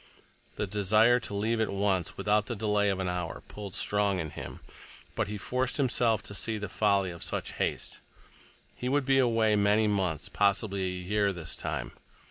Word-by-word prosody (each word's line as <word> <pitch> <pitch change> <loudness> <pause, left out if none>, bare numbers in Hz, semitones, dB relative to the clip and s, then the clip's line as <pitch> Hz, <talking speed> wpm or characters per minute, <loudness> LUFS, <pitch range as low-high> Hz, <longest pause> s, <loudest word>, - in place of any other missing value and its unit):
The - - -1
desire 105 +4 +4
to 105 -3 -5
leave 110 +3 0
at 110 - +1
once, 95 -3 0
without 105 +1 +1
the 120 - -3
delay 105 -1 +1
of 95 - 0
an 95 - -1
hour, 90 -2 -3
pulled 100 -3 -8
strong 105 -2 +1
in 80 -4 -3
him, - - -8 0.5
but - - -1
he 105 +1 -4
forced 125 +5 -1
himself 120 -6 +2
to - - -8
see 110 +2 0
the 100 -1 -4
folly 100 -2 +2
of 85 - -10
such - - -3
haste. - - -2 0.7
He 125 - -3
would 140 0 +1
be 135 0 +4
away 115 -4 +3
many 105 +1 +3
months, 95 -7 0
possibly 100 -1 +1
a 90 0 -3
year 100 +1 +1
this 85 -3 -6
time. - - -4
105 Hz, 185 wpm, -29 LUFS, 95-110 Hz, 0.7 s, desire